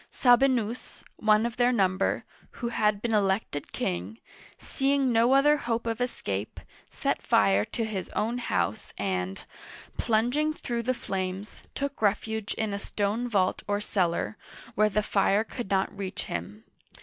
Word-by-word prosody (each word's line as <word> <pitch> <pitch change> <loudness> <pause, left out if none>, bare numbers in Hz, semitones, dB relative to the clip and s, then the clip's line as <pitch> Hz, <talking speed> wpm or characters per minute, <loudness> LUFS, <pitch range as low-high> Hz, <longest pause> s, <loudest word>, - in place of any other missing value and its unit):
Sabi'nus, 245 -2 +2
one 215 +1 +4
of 235 -1 -3
their 245 0 +4
number, 190 -5 +1 0.3
who 235 - -3
had 210 -3 +1
been 235 -2 0
elected 195 -7 0
king, 90 +5 -3 0.4
seeing 275 -1 +1
no 230 +3 +4
other 295 +2 +5
hope 235 -4 -2
of 230 +1 -2
escape, 100 - -3 0.3
set - - -1
fire 100 0 +4
to 230 - -3
his 200 -4 -4
own 235 +3 0
house 95 - -2
and, 95 -1 -2 0.5
plunging 250 +8 +1
through 240 -5 -3
the 255 +2 0
flames, 190 -1 -4
took 280 -2 -3
refuge 220 +1 0
in 220 -2 -1
a 200 - -2
stone 210 +4 -1
vault 190 -5 +1
or 205 0 +1
cellar, 190 0 0 0.4
where 215 0 +3
the 210 +1 0
fire 200 +1 +2
could 230 -2 -6
not 195 +1 +1
reach 195 -1 -4
him. 90 +6 -6
215 Hz, 150 wpm, -28 LUFS, 190-240 Hz, 0.5 s, other